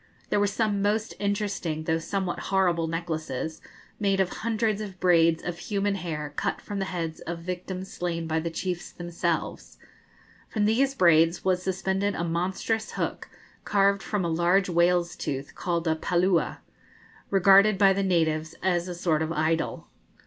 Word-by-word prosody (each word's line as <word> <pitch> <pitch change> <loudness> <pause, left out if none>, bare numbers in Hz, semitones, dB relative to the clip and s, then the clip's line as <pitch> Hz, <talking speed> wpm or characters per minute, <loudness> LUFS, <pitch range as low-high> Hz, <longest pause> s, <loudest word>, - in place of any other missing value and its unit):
There - - +3
were 205 - +3
some 205 0 0
most 215 +2 0
interesting 200 -6 -2
though 160 +1 0
somewhat 185 +1 -2
horrible 180 -4 +2
necklaces 160 -3 -4 0.4
made 195 -2 +1
of 190 -2 +2
hundreds 220 -1 -1
of 195 -3 -7
braids 165 -3 +4
of 175 -1 -4
human 200 +1 -1
hair 155 -6 -4
cut - - -1
from 205 -1 -5
the 195 - -1
heads 165 -4 -4
of 170 +1 -5
victims 185 +1 -5
slain 170 -2 -3
by 160 0 0
the 170 +1 -2
chiefs 175 +1 -4
themselves; 175 -1 -3 0.7
from 210 -2 0
these 265 +6 +2
braids 165 -4 +4
was 185 -1 +2
suspended 190 +2 -1
a 170 - -2
monstrous 185 +6 -1
hook - - -3 0.3
carved 200 -1 +2
from 205 -4 -2
a - - +1
large 175 +4 +2
whale's 175 0 +2
tooth, 135 0 -4
called 170 -2 -2
a 160 - +3
Paloola, 175 +2 +1 0.7
regarded 195 +1 +6
by 195 0 +5
the 195 - -1
natives 160 -4 0
as 175 -1 +1
a 180 - -5
sort 165 -3 +1
of 160 0 -1
idol. 160 +1 -1
180 Hz, 160 wpm, -26 LUFS, 165-195 Hz, 0.7 s, regarded